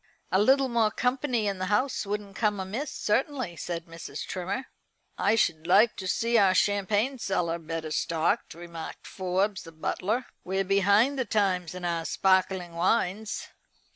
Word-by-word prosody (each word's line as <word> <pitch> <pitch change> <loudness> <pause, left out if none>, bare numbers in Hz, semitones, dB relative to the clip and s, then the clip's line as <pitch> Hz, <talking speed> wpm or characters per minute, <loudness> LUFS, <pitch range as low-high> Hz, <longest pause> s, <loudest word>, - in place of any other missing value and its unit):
"A 190 +2 +4
little 270 +4 +4
more 230 -3 +2
company 250 -1 0
in 200 -2 -1
the 185 - -2
house 210 +2 0
wouldn't 205 -1 -4
come 210 -3 +1
amiss, 215 +10 -4
certainly," 255 - -1
said 170 0 -4
Mrs. 165 0 -7
Trimmer. 190 +8 -3 0.5
"I - - +2
should 160 -7 +1
like 215 +5 +5
to 190 - -5
see 230 +4 +2
our 190 -2 +4
champagne 205 +7 +1
cellar 170 -5 -1
better 160 -1 -5
stocked," 165 +7 0
remarked 170 -1 -8
Forbes 190 +2 -1
the 165 - -11
butler. 205 +9 -2 0.2
"We're 190 +1 -1
behind 200 +8 +3
the 260 - +1
times 185 -5 0
in 180 -1 -5
our 170 -1 -1
sparkling 185 -2 +1
wines." 190 +4 0
195 Hz, 155 wpm, -28 LUFS, 180-220 Hz, 0.5 s, like